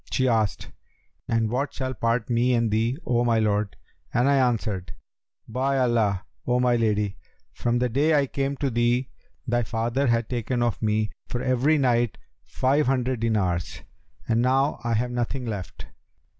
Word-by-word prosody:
She 130 -1 +1
asked, 110 -4 0 0.6
'And 115 -2 +1
what 135 +4 -2
shall 130 -1 -3
part 115 -2 0
me 120 +1 +2
and 115 -2 +1
thee, 115 +4 +1
O 120 -1 +2
my 115 -1 +2
lord?'; 105 -3 0 0.4
and 120 +3 +2
I 140 - +4
answered, 110 -7 0 0.5
'By 130 +4 0
Allah, 110 -6 +1 0.2
O 125 0 +2
my 125 -1 +3
lady, 105 -3 0 0.4
from 120 0 0
the 125 +1 +1
day 145 +6 +2
I 145 -1 +3
came 140 +1 -2
to 140 -1 -1
thee, 120 +2 +1 0.3
thy 120 -1 +1
father 120 +4 -1
hath 115 -2 +1
taken 120 0 -1
of 120 -3 -1
me, 105 -1 0 0.2
for 120 - -3
every 130 +5 +2
night, 120 -4 +1 0.3
five 135 +2 +1
hundred 130 -2 0
dinars, 95 -7 -1 0.4
and 115 0 +2
now 135 +3 +2
I 115 -1 0
have 120 +3 0
nothing 120 +2 -2
left. 100 -7 -6
120 Hz, 165 wpm, -25 LUFS, 110-130 Hz, 0.6 s, I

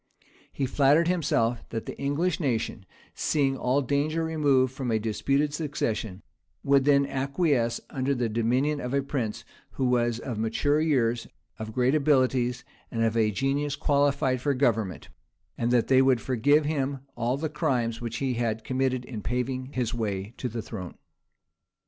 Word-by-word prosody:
He 135 - -2
flattered 145 +5 +3
himself 145 -9 +1
that 115 -1 -4
the - - -6
English 150 +5 0
nation, 115 - -2 0.3
seeing 135 -3 +1
all 135 +2 +1
danger 145 +5 0
removed 140 -5 +1
of 125 - -1
a 110 - +2
disputed 140 +7 0
succession, 115 - -3 0.4
would 140 -1 +3
then 140 -1 +4
acquiesce 135 -3 0
under 135 +1 0
the 120 -2 0
dominion 125 +7 0
of 125 +2 -2
a 140 - +1
prince 125 -6 -3 0.3
who 130 - -1
was 120 -2 +2
of 120 -2 -5
mature 145 +7 +1
years, 120 -7 +1 0.3
of 110 0 -5
great 125 +3 +2
abilities, 130 -4 +2 0.3
and 115 -1 -1
of 115 0 +1
a 110 -2 +3
genius 140 +6 -1
qualified 140 -3 +1
for 140 0 +1
government; 115 -8 0 0.5
and 120 - -1
that 120 -2 +3
they 130 0 +5
would 130 -2 +4
forgive 145 +5 +2
him 140 -3 -1
all 120 +3 0
the 160 +3 -2
crimes 120 -6 -1
which 120 0 -4
he 135 -2 -1
had 115 -2 -2
committed 130 0 -1
in 115 -4 -6
paving 125 +3 -2
his 125 -2 -1
way 105 -2 -3
to 125 - -3
the 115 -1 -5
throne. 90 -6 -7
130 Hz, 160 wpm, -27 LUFS, 115-140 Hz, 0.5 s, they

